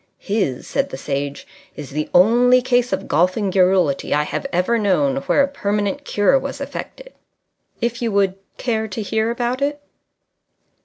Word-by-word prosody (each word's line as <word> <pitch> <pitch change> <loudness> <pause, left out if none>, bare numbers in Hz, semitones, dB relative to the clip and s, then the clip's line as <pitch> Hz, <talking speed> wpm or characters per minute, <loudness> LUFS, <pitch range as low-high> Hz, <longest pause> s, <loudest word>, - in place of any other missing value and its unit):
"His," 195 - -2
said - - -1
the - - -6
Sage, 140 +1 -4 0.3
"is 145 -2 -8
the 150 +2 -3
only 240 +7 +5
case 245 -1 +1
of - - -2
golfing 185 +5 +1
garrulity 180 -7 +2
I 150 - +2
have 215 - -4
ever 225 +6 +1
known 175 -10 +1
where 280 - +2
a - - +1
permanent 210 +1 -2
cure 210 +6 +3
was - - -6
affected. - - -7 0.7
If 235 +1 -2
you 230 -2 0
would 200 -2 +2 0.2
care 220 -3 -1
to 210 +2 -5
hear 220 +2 0
about 240 +2 -2
it 290 +1 -1
205 Hz, 160 wpm, -20 LUFS, 180-245 Hz, 0.7 s, only